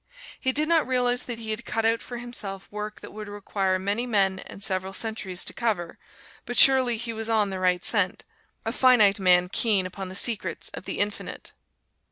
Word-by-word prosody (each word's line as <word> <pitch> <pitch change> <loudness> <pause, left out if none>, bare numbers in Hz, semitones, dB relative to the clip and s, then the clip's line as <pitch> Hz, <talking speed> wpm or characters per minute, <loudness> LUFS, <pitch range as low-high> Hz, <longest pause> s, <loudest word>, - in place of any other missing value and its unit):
He 260 - +1
did 300 +3 +1
not 325 -4 +2
realize 250 -1 +1
that 240 -2 -5
he 220 -1 -5
had 215 +2 -3
cut 225 -1 -2
out 225 0 +2
for 240 - -7
himself 210 -5 -7
work 210 0 -6
that - - -11
would 215 0 -8
require 195 -2 -1
many 200 +6 -2
men 195 -4 +1
and 195 - -10
several 190 -1 -2
centuries 195 -4 -2
to - - +1
cover, 205 -8 -2 0.5
but 245 - -4
surely 260 -3 +6
he 230 0 -4
was 225 0 -4
on 215 -3 +2
the 190 - -4
right 180 -1 +1
scent 200 -5 +1 0.4
a 225 - -1
finite 230 -6 +4
man 180 -1 +4
keen 200 0 +2
upon 185 +1 -6
the 185 - -8
secrets 200 -6 +2
of - - -9
the - - -4
Infinite! 205 +1 -3
210 Hz, 200 wpm, -25 LUFS, 190-235 Hz, 0.5 s, surely